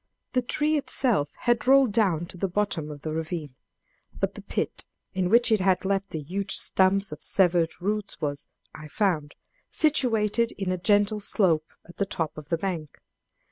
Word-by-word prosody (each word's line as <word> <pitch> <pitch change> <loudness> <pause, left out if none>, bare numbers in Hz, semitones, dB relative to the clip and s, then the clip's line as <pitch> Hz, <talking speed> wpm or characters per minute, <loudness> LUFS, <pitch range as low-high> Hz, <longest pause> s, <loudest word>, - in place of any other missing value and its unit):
The 255 - +3
tree 300 +5 +1
itself 245 - 0
had 240 0 +1
rolled 270 -3 +6
down 185 -7 +2
to 175 - -12
the 195 - 0
bottom 185 -5 -1
of 145 -2 -9
the 155 - -3
ravine; 160 -3 -4 0.7
but - - 0
the - - -9
pit - - -3 0.3
in 185 -1 0
which 235 +2 +4
it 215 - +4
had 185 0 +2
left 195 0 0
the 160 - -4
huge 195 +6 -2
stumps 195 +1 +3
of - - -8
severed 175 -3 +2
roots 205 -1 -3
was, 145 -3 -3 0.3
I 155 - -10
found, 155 -5 -1 0.3
situated 235 -7 +2
in 195 -2 -3
a 185 - 0
gentle 205 +2 +2
slope 170 -6 +1 0.2
at 175 - -15
the 200 - 0
top 160 -5 -3
of 155 -1 -10
the 165 - +1
bank! 165 -5 -4
190 Hz, 180 wpm, -26 LUFS, 165-215 Hz, 0.7 s, rolled